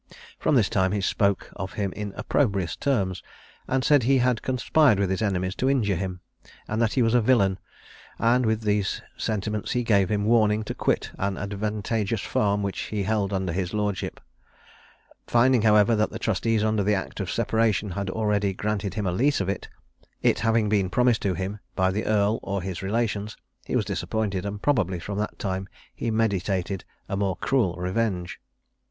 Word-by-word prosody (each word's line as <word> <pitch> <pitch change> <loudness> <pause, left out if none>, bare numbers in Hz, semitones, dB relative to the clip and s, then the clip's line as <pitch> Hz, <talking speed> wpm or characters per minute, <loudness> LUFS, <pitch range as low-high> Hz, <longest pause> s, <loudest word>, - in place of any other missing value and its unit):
From 150 - +2
this 110 -6 +4
time 95 0 +1
he 105 - 0
spoke 100 0 0
of 95 -1 -5
him 100 -3 -2
in 105 0 -5
opprobrious 100 - 0
terms, 100 -10 0 0.5
and 130 0 0
said 145 0 +5
he 135 +3 +3
had 125 -2 +2
conspired 130 -1 +3
with 100 -2 0
his 95 - -1
enemies 95 -3 0
to 130 - +1
injure 110 -8 +2
him, 90 0 -4 0.5
and 110 +2 -1
that 115 -2 +2
he 130 - +3
was 115 0 +2
a 120 - +5
villain; 100 -5 +3 0.6
and 120 +2 +3
with 110 -1 +1
these 105 -2 0
sentiments 105 -1 -2
he 125 - 0
gave 100 -5 +3
him 105 -1 0
warning 110 -1 +3
to - - -4
quit - - -1
an 100 0 -1
advantageous 105 +1 -2
farm 100 0 0
which 100 -1 -3
he 105 -2 -2
held 100 -1 0
under 95 -3 -1
his 95 +2 -2
lordship. 105 -2 -2 1.1
Finding, 120 0 +4
however, 105 +1 +5
that 105 0 +1
the 115 - -6
trustees 110 0 0
under 110 -1 +1
the 105 +1 +2
act 95 - -5
of 95 -3 -3
separation 110 -2 +1
had 100 +1 -3
already 105 -1 0
granted 105 -1 -2
him 105 -2 -2
a 90 - +1
lease 135 +10 +2
of 95 -1 -1
it, 100 - -4 0.5
it - - +3
having 115 0 +2
been 100 -3 +1
promised 125 0 +2
to 95 -2 0
him 95 +4 -4 0.2
by 95 -1 +2
the 105 +3 -2
earl 105 +1 +2
or 100 -2 -3
his 95 -2 -4
relations, 105 +1 -2 0.3
he - - -3
was - - +1
disappointed, 100 -3 -2
and 100 0 -6
probably 100 - +1
from 100 +4 -5
that 105 - -3
time 95 0 -3 0.3
he 115 - -3
meditated 100 -4 0 0.2
a - - -2
more 100 -2 0
cruel 115 -10 +1
revenge. 90 -1 -2
105 Hz, 185 wpm, -25 LUFS, 95-115 Hz, 1.1 s, said